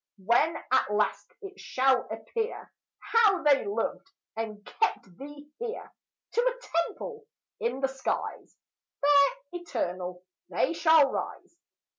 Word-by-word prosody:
When 290 - +3
at 260 -5 +3
last 210 0 0
it 395 0 -9
shall 260 -1 +2
appear 450 0 -4 0.3
How 415 -6 +3
they 285 -2 +5
loved 410 +1 -2 0.3
and 215 -2 -5
kept 180 - -1
thee 290 +1 -10
here, 470 0 -5 0.4
To 475 - +2
a - - 0
temple 450 -2 -8 0.3
in 245 +3 -2
the 270 - +3
skies, 265 0 -4 0.4
Fair, 285 +11 +5 0.2
eternal, 180 - -4 0.3
they 295 - +1
shall 320 -3 +6
rise. - - -5
290 Hz, 120 wpm, -28 LUFS, 245-395 Hz, 0.4 s, shall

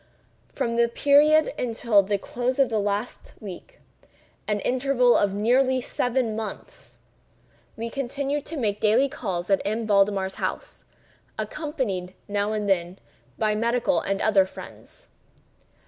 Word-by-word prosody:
From 235 0 -2
this 235 0 +3
period 300 +2 +4
until 230 -3 +2
the 200 +1 -1
close 245 +5 -3
of 270 -4 +3
last 210 +1 -2
week—an 210 - -9
interval 250 -1 +2
of 200 -1 +2
nearly 255 +5 +2
seven 245 -2 -1
months—we 225 +1 -10
continued 280 +2 -2
to 325 - -6
make 210 -5 -1
daily 225 +6 +4
calls 190 -8 -4
at 195 - +3
M. 220 +3 -2
Valdemar's 200 -2 +2
house, - - -4 0.5
accompanied, 260 - -3
now 205 0 -1
and 210 -1 -2
then, 180 -1 0 0.4
by 215 -1 +1
medical 235 +5 +1
and 195 0 -2
other 195 -3 +4
friends. - - -12
225 Hz, 120 wpm, -25 LUFS, 200-260 Hz, 0.5 s, period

